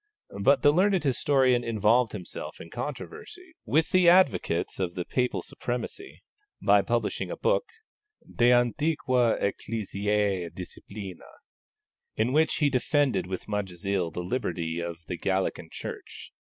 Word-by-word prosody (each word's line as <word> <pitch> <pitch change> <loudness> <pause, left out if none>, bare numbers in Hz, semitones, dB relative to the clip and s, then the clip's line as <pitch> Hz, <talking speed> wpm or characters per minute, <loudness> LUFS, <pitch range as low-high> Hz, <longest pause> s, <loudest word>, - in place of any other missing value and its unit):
But 135 +6 +4
the 145 - +7
learned 190 +1 +3
historian 130 -2 +2
involved 115 +1 +2
himself 95 -5 -7
in 85 - -11
controversy 325 - -7
with 160 +1 +1
the 185 -2 +6
advocates 110 - +2
of 90 -2 -2
Papal 125 -1 0
supremacy 125 - -6 0.4
by - - +4
publishing - - -1
a - - -5
book, - - +1 0.6
De 120 +1 +3
Antiqua 125 -1 +2
Ecclesiae 100 -3 -1
disciplina, 95 +1 -9 0.9
in 115 +4 0
which 155 +1 +3
he 145 -2 +2
defended 130 - +1
with 95 0 -5
much 105 -2 -2
zeal 90 0 -2
the 90 +2 -5
liberty 85 -6 -2
of 85 -1 -4
the 90 - -5
Gallican 95 0 -1
Church. - - -8
115 Hz, 125 wpm, -27 LUFS, 95-145 Hz, 0.9 s, the